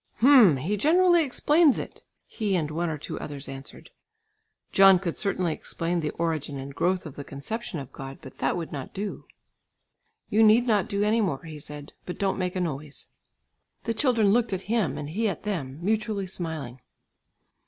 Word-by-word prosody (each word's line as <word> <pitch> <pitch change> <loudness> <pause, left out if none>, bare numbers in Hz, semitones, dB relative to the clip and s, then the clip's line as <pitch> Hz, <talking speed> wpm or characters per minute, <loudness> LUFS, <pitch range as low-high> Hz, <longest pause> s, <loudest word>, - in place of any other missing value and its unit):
"Hm! 235 - +7
he 185 +11 -2
generally 345 - +4
explains 300 +2 +3
it," - - -7 0.2
he 210 -4 -2
and 155 -4 -1
one 170 +2 -1
or 155 - -3
two 145 - -6
others 145 -2 -7
answered. 135 0 -10 0.8
John 195 -1 +7
could 175 -2 -4
certainly 185 -5 0
explain 170 +3 -2
the 155 -2 -1
origin 155 -4 -2
and 135 +1 -7
growth 175 +5 0
of 150 - -8
the 145 - -6
conception 175 - -5
of 135 -3 -7
God, 135 0 -8
but 130 - -13
that - - 0
would 165 -2 -5
not 140 -3 -7
do. 200 +1 -5 1.0
"You 220 0 +2
need 220 +2 +6
not 210 -6 +1
do 200 0 0
any 220 +2 +2
more," 165 -10 -1
he 155 -2 -8
said, 145 0 -10
"but 180 - -5
don't 195 -1 0
make 180 0 -2
a - - -1
noise." 150 -4 -5 0.7
The 230 - -1
children 225 -4 +3
looked 230 -1 +2
at 190 - -3
him, 220 -3 0
and 150 - -5
he 220 +5 0
at 190 - -5
them 150 -11 -3
mutually 215 0 0
smiling. 160 -9 -5
180 Hz, 185 wpm, -26 LUFS, 150-215 Hz, 1.0 s, Hm